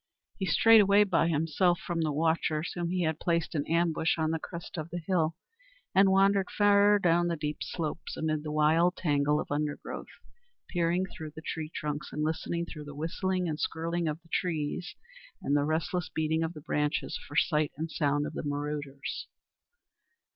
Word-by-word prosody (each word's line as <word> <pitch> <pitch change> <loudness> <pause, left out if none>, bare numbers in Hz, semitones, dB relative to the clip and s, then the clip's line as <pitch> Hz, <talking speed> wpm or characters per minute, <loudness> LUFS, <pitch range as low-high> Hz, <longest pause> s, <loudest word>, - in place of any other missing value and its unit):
He 190 - -1
strayed 225 +5 +7
away 200 +1 +5
by 180 -4 +2
himself 165 +3 +2
from 170 -2 -3
the 155 -2 +1
watchers 160 +1 0
whom 175 -1 -2
he 180 0 0
had 160 -1 -1
placed 170 -1 0
in 145 -3 -1
ambush 165 0 +1
on 160 -1 +1
the 160 - -1
crest 170 +1 -8
of 160 -1 -5
the 175 - -4
hill, 165 -4 +1 0.6
and 195 +1 +6
wandered 195 0 +3
far 205 0 +5
down 175 -2 +3
the 170 - 0
steep 150 -1 -3
slopes 165 -1 -4
amid 155 -1 -1
the 150 0 -5
wild 160 +4 +3
tangle 150 -2 +1
of - - -5
undergrowth, 145 0 -3 0.6
peering 175 +1 +1
through 155 -5 -9
the 160 - -9
tree 160 -2 -4
trunks 150 -2 -4
and 150 - -2
listening 165 +2 -1
through 150 -3 -9
the 145 -1 -9
whistling 180 +4 -1
and 155 -1 -3
skirling 165 +2 -1
of 155 +1 -2
the 165 - -23
wind 155 -4 -2 0.6
and 140 - +1
the 145 0 +2
restless 160 +2 -1
beating 160 0 0
of 165 +1 -2
the 150 - -8
branches 150 0 -1
for 145 - -10
sight 150 0 +2
and 160 +1 -4
sound 145 -2 +1
of 150 - -5
the - - -3
marauders. 145 -1 -4
160 Hz, 185 wpm, -29 LUFS, 150-175 Hz, 0.6 s, strayed